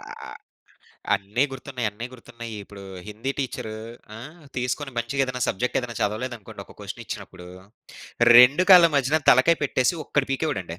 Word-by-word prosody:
ఆహ్, - - -10 0.8
అన్నీ 105 +7 0
గుర్తున్నయి, 130 -2 -5
అన్నీ 115 +4 -7
గుర్తున్నాయిప్పుడు. 110 -5 -10 0.2
హిందీ 115 +6 -4
టీచరూ 110 -4 -4 0.4
ఆ! - - -9 0.4
తీసుకొని 125 +2 -3
మంచిగేదైనా 125 +1 -1
సబ్జెక్టేదైనా 125 +2 -2
చదవలేదనుకోండి 110 +1 -4
ఒక - - -17
క్వెషనిచ్చినప్పుడూ, 90 -1 -8 0.9
2 135 +9 +7
కాళ్ళ 175 -2 +9
మధ్యన 140 +4 +2
తలకాయ 145 +7 +5
పెట్టేసి 130 +4 +1
ఒక్కటి 140 -2 -1
పీకేవాడండి. 95 - -3
125 Hz, 115 wpm, -24 LUFS, 110-135 Hz, 0.9 s, కాళ్ళ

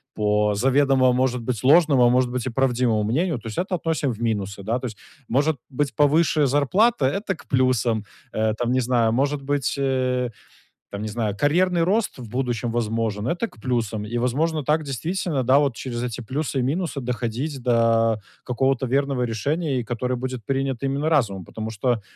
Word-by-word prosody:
по 105 0 +2
заведомо, 130 +2 +3
может 125 -1 +1
быть, 115 0 -3
ложному, 145 -3 +5
а - - +6
может 125 0 +3
быть, 125 0 -3
и - - -1
правдивому 120 -4 +1
мнению, 145 - 0
то 115 - -10
есть 110 - -6
это 185 +1 -1
относим 160 -5 -1
в 110 - -11
минусы, 100 -3 -2
да. 115 +4 0
То 130 - -6
есть 110 -4 -6 0.3
может 145 +4 +1
быть 140 +1 -2
повыше 150 0 +3
зарплата- 145 - +2
это 195 +7 -1
к - - -17
плюсам. 125 -5 +2 0.3
Э, 110 0 0
там, 120 0 -1
не 130 - +2
знаю, 120 -2 +2
может 140 +4 0
быть, 140 -2 -1
э, 130 -2 0 0.6
там, 100 +1 -5
не 110 - -3
знаю, 105 -2 -2
карьерный 175 - +2
рост 205 - 0
в 120 - -8
будущем 120 -1 -2
возможен- 115 -2 -1
это 175 - -1
к 110 - -20
плюсам. 115 -4 -1
И 120 +3 -3
возможно 150 +6 0
так, 155 +2 +2
действительно, 155 +1 -2
да, 130 +3 +5
вот 140 -4 +1
через 120 -2 -4
эти 125 -1 -4
плюсы 135 +4 -3
и - - +1
минусы 155 +2 -1
доходить 125 +3 -3
до 115 -2 +2 0.2
какого-то 130 +1 0
верного 135 0 0
решения, 140 +6 -1
и - - -5
которое 125 +2 -2
будет 130 -2 -5
принято 135 +1 -1
именно 140 +3 -1
разумом. 110 - +1
Потому 110 +4 -6
что 115 0 -1
130 Hz, 185 wpm, -23 LUFS, 115-145 Hz, 0.6 s, а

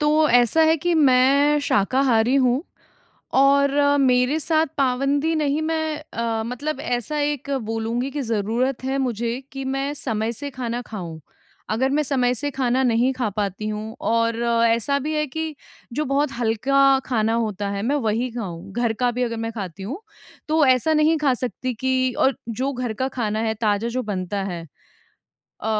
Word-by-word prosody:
तो 300 +1 +3
ऐसा 245 +6 +4
है 320 +1 +4
कि 345 +3 0
मैं 280 0 +4
शाकाहारी 245 +1 +2
हूँ 260 +1 +3 0.8
और 280 0 +4 0.3
मेरे 255 +2 +3
साथ 315 +1 +2
पाबंदी 275 +4 +1
नहीं, 300 -1 0
मैं 315 -1 -1 0.2
अ, 225 -1 -1
मतलब 265 +5 -4
ऐसा 245 +3 -2
एक 290 -1 -2 0.2
बोलूँगी 230 +4 -2
कि 290 +1 -3
ज़रूरत 235 +3 -1
है 265 +1 -1
मुझे 240 -2 -1
कि 270 0 -5
मैं 270 +2 -2
समय 225 -5 -2
से 285 +5 -6
खाना 245 -2 -4
खाऊँ। 175 -9 -7 0.5
अगर 245 +5 +1
मैं 295 +2 +1
समय 255 -3 +1
से 290 +4 -2
खाना 260 -1 +1
नहीं 245 +1 +2
खा 245 -4 -1
पाती 205 0 -3
हूँ 215 +1 -5
और 230 0 +1
अ, 235 -1 +2
ऐसा 235 +5 +1
भी 300 +3 -3
है 300 - +1
कि 320 +2 -4 0.4
जो 305 +3 -1
बहुत 275 +1 +1
हल्का 270 +4 +3
खाना 225 -3 +1
होता 210 -3 -1
है, 200 0 -3
मैं 265 +7 0
वही 235 -1 0
खाऊँ। 195 -5 -6
घर 235 0 0
का 245 +2 0
भी 250 +1 -1
अगर 230 -2 -2
मैं 225 0 -3
खाती 195 -5 -7
हूँ 275 - -5 0.5
तो 310 -1 +3
ऐसा 260 +5 +3
नहीं 310 +1 +3
खा 290 -3 +2
सकती 250 +1 -3
कि 260 +2 0
और 270 - +3
जो 255 +5 -2
घर 245 -3 -3
का 260 +4 -1
खाना 220 -5 -2
है, 220 0 0
ताजा 215 0 0
जो 255 +2 -2
बनता 195 -1 -3
है 170 -1 -6 1.0
अ, - - -5
250 Hz, 175 wpm, -22 LUFS, 225-280 Hz, 1.0 s, ऐसा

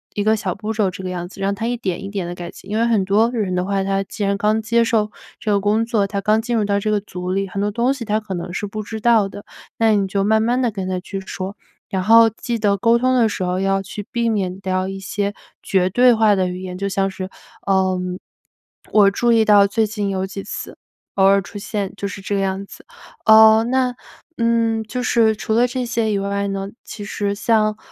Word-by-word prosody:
一 205 - 0
个 220 +1 +3
小 190 -4 -2
步 220 +3 -4
骤 210 -4 +1
这 185 - -8
个 185 - -3
样 175 -1 -5
子， 195 - -14
让 195 +1 0
她 225 - -4
一 240 +1 -1
点 190 -5 -3
一 195 - -5
点 195 -4 -3
地 175 - -5
改 175 -1 -7
进。 - - -14
因 210 - -1
为 230 - +2
很 220 -5 +2
多 210 +4 +3
人 210 -7 -1
的 180 - 0
话， 195 0 -1
她 195 0 0
既 205 +1 -4
然 200 0 +1
刚 215 +2 +1
接 230 +2 +2
受 215 -2 +1 0.3
这 215 - -4
个 200 - +2
工 215 +3 +1
作， 220 -4 +1
她 200 0 -3
刚 215 +3 +2
进 240 0 -1
入 215 - +1
到 200 0 +1
这 215 +1 -1
个 210 - +2
组 180 -3 -6
里， 195 +1 -1
很 195 +2 -4
多 205 0 0
东 240 +5 +1
西 270 -4 -6
她 215 -1 0
可 215 -3 -7
能 175 0 -5
是 205 +3 -3
不 215 +1 -5
知 220 +1 -6
道 220 -3 +3
的， 205 - -10 0.3
那 225 -1 +3
你 195 -1 +1
就 195 +1 0
慢 220 +1 +3
慢 245 +3 +1
地 240 -3 +1
跟 190 -2 -4
她 185 -1 -1
去 195 +1 -6
说。 190 +1 -6 0.3
然 190 -1 -1
后 225 +3 +7
记 230 +1 -4
得 205 -2 +2
沟 230 +4 +3
通 255 +1 +2
的 235 -3 +3
时 200 - -3
候 180 +1 -1
要 195 0 +1
去 205 +1 -7
避 235 -2 0
免 195 -4 -1
掉 185 0 -1
一 195 0 -6
些 200 +1 -2 0.3
绝 185 -1 +1
对 245 +5 +5
化 220 -2 +4
的 185 -1 0
语 180 0 -5
言， 180 -1 -6
就 200 +1 -2
像 195 0 0
是， 185 0 -6 0.4
呃 190 -1 +2 0.9
“我 205 -2 +6
注 240 +3 +1
意 225 -1 +4
到 205 -1 +6
最 215 +2 +1
近 205 -2 -3
有 190 0 -2
几 195 0 -7
次”， - - -7 0.4
“偶 195 - +2
尔 195 0 +5
出 200 +3 -10
现” 205 -2 -4
就 200 - -5
是 200 - -7
这 200 +1 -2
个 195 - 0
样 195 0 -2
子。 - - -14 0.4
呃， 220 0 +7
那 250 0 0 0.4
嗯， 230 -1 +1
就 220 +4 -4
是 230 -3 +3
除 220 - -3
了 235 +2 +4
这 250 0 -3
些 230 -2 0
以 200 - 0
外 200 0 -2
呢， 195 0 -3 0.2
其 205 - -8
实 205 -1 -2
像， 215 -1 +1
205 Hz, 270 characters per minute, -20 LUFS, 195-225 Hz, 0.9 s, 后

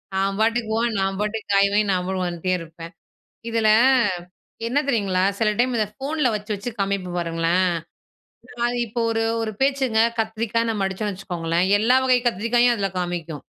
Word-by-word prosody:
நான் 195 +1 0
பாட்டுக்கு 225 0 +1
போன 235 +1 +1
நான் 195 0 -1
பாட்டுக்கு 210 0 -3
காய்வாங்கி, 200 +1 +3
நான் 180 -1 0
பாட்டுக்கு 185 -1 -2
வந்துட்டே 175 +1 -2
இருப்பேன். 165 +1 -10 0.6
இதில 225 -1 +2 1.0
என்ன 260 +5 +1
தெரியுங்களா? 200 -7 +1 0.2
சில 225 - +2
டைம் 245 +1 +1
இத 215 - +1
ஃபோன்ல 280 0 0
வச்சு, 210 +1 -4
வச்சு 205 +4 -5
காமிப்பேன் 190 -3 -2
பாருங்களேன். 170 +2 +1 1.2
இப்போ 225 +2 -5
ஒரு 225 0 0 0.2
ஒரு 220 -1 -3
பேச்சுங்க 265 -5 +2 0.2
கத்திரிக்காய் 230 +1 -1
நம்ம 205 -3 -1
அடிச்சோம்னு 195 +1 -4
வச்சுக்கோங்களேன். 175 -2 -1
எல்லா 245 +4 +4
வகை 255 -1 +4
கத்திரிக்காயும் 240 +3 +2
அதில 200 -3 -1
காமிக்கும். 170 -4 -4
205 Hz, 150 wpm, -22 LUFS, 185-230 Hz, 1.2 s, எல்லா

